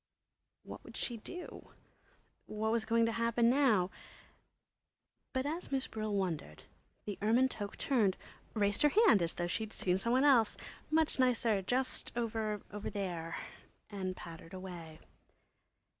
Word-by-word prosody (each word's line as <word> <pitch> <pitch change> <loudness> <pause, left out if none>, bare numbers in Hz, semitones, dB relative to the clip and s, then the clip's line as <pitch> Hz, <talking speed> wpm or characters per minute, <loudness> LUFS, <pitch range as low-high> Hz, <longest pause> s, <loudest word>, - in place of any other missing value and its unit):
What - - -10
would - - -10
she 240 - -1
do? 355 +11 -9 0.7
What 220 +1 -1
was 230 -1 +1
going 230 0 +3
to 230 - +1
happen 230 +1 +2
now? 225 -10 +3 1.4
But 260 0 -1
as 320 +3 -4
Miss 270 -1 0
Brill 215 -1 -4
wondered, 165 - -3 0.4
the 205 -2 -5
ermine 235 +5 +4
toque 205 -4 -6
turned, 220 -9 +2 0.4
raised 205 -1 +2
her 295 - +6 0.2
hand 210 - +6
as 170 0 +2
though 175 - -2
she'd 215 +5 -3
seen 180 0 +1
some 235 +4 +2
one 260 +2 +4
else, 250 -7 +5 0.3
much 315 -3 +2
nicer, 235 -5 +3
just 255 +7 +1
over 220 -3 -1
there, 190 -5 -4 0.5
and 190 -2 -3
pattered 165 +1 -10
away. 175 -4 -8
215 Hz, 140 wpm, -34 LUFS, 190-245 Hz, 1.4 s, her